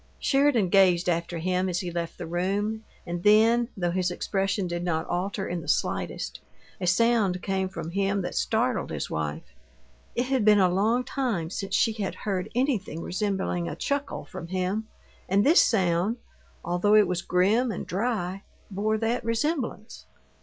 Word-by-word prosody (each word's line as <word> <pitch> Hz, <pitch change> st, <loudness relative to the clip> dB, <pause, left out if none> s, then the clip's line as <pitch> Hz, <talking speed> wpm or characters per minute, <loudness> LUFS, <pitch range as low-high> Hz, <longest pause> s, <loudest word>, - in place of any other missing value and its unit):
Sheridan 270 Hz, -8 st, +2 dB
gazed 180 Hz, -2 st, +4 dB
after 170 Hz, 0 st, -1 dB
him 185 Hz, +2 st, 0 dB
as 180 Hz, +1 st, -1 dB
he 180 Hz, -2 st, -4 dB
left 170 Hz, -1 st, -4 dB
the -, -, -6 dB
room, 200 Hz, +6 st, -1 dB, 0.2 s
and 175 Hz, 0 st, -4 dB
then, 225 Hz, +4 st, +5 dB
though 175 Hz, -2 st, 0 dB
his 180 Hz, 0 st, 0 dB
expression 195 Hz, +2 st, -1 dB
did 175 Hz, 0 st, -3 dB
not 165 Hz, -2 st, -1 dB
alter 190 Hz, +3 st, -2 dB
in 175 Hz, -1 st, -3 dB
the -, -, -11 dB
slightest, -, -, -1 dB, 0.4 s
a 180 Hz, -, -2 dB
sound 195 Hz, -1 st, +2 dB
came 190 Hz, -1 st, -1 dB
from 165 Hz, -3 st, -6 dB
him 195 Hz, +1 st, 0 dB
that -, -, -4 dB
startled -, -, 0 dB
his -, -, -4 dB
wife. 75 Hz, -3 st, -4 dB, 0.6 s
It 245 Hz, -, +1 dB
had 260 Hz, -2 st, 0 dB
been 210 Hz, 0 st, +6 dB
a 185 Hz, -2 st, +4 dB
long 225 Hz, +6 st, +2 dB
time 220 Hz, -13 st, -2 dB
since 195 Hz, -1 st, -3 dB
she 225 Hz, -, +3 dB
had 210 Hz, -3 st, -3 dB
heard 190 Hz, -3 st, -3 dB
anything 230 Hz, -, -1 dB
resembling 190 Hz, -3 st, -1 dB
a -, -, -5 dB
chuckle 285 Hz, 0 st, -3 dB
from 165 Hz, -, -8 dB
him, 190 Hz, +4 st, -2 dB, 0.4 s
and 200 Hz, +2 st, +3 dB
this 320 Hz, +4 st, +7 dB
sound 190 Hz, +1 st, +1 dB, 0.5 s
although 180 Hz, +5 st, +2 dB
it 210 Hz, -2 st, +6 dB
was 180 Hz, 0 st, -1 dB
grim 210 Hz, +8 st, +2 dB
and 195 Hz, -, -5 dB
dry 195 Hz, -2 st, -2 dB, 0.3 s
bore 215 Hz, +3 st, 0 dB
that 230 Hz, +3 st, -1 dB
resemblance. 230 Hz, -1 st, -2 dB
195 Hz, 165 wpm, -26 LUFS, 175-220 Hz, 0.6 s, this